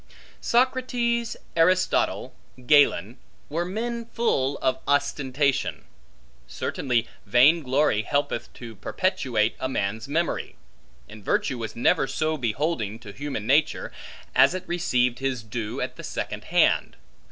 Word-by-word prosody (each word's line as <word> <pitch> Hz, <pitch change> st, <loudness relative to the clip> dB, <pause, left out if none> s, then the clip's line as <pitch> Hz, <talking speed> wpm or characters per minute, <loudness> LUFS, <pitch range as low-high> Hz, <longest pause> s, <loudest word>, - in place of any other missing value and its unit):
Socrates, 240 Hz, -2 st, +1 dB, 0.2 s
Aristotle, 180 Hz, +3 st, +2 dB, 0.3 s
Galen, 125 Hz, -, +4 dB, 0.3 s
were 170 Hz, +4 st, -1 dB
men 230 Hz, +5 st, -3 dB
full 145 Hz, -, 0 dB
of 130 Hz, 0 st, 0 dB
ostentation. 140 Hz, -1 st, 0 dB, 0.6 s
Certainly 115 Hz, -, -1 dB, 0.2 s
vain 130 Hz, +10 st, +5 dB
glory 130 Hz, -5 st, +2 dB
helpeth 140 Hz, +7 st, -2 dB
to 115 Hz, -2 st, -9 dB
perpetuate 125 Hz, -, 0 dB
a 130 Hz, -, -2 dB
man's 110 Hz, -1 st, -2 dB
memory; 165 Hz, +4 st, -1 dB, 0.5 s
and 105 Hz, +5 st, -12 dB
virtue 125 Hz, +5 st, 0 dB
was 110 Hz, -2 st, -5 dB
never 120 Hz, +3 st, +2 dB
so 155 Hz, +2 st, -1 dB
beholding 120 Hz, -4 st, -1 dB
to 105 Hz, -3 st, -11 dB
human 140 Hz, -4 st, -5 dB
nature, 145 Hz, +6 st, +2 dB, 0.4 s
as -, -, +5 dB
it 185 Hz, -, -4 dB
received 125 Hz, -8 st, +1 dB
his 135 Hz, -4 st, -2 dB
due 110 Hz, 0 st, -4 dB
at -, -, -4 dB
the -, -, -8 dB
second -, -, -5 dB
hand. -, -, +2 dB
135 Hz, 120 wpm, -25 LUFS, 115-170 Hz, 0.6 s, vain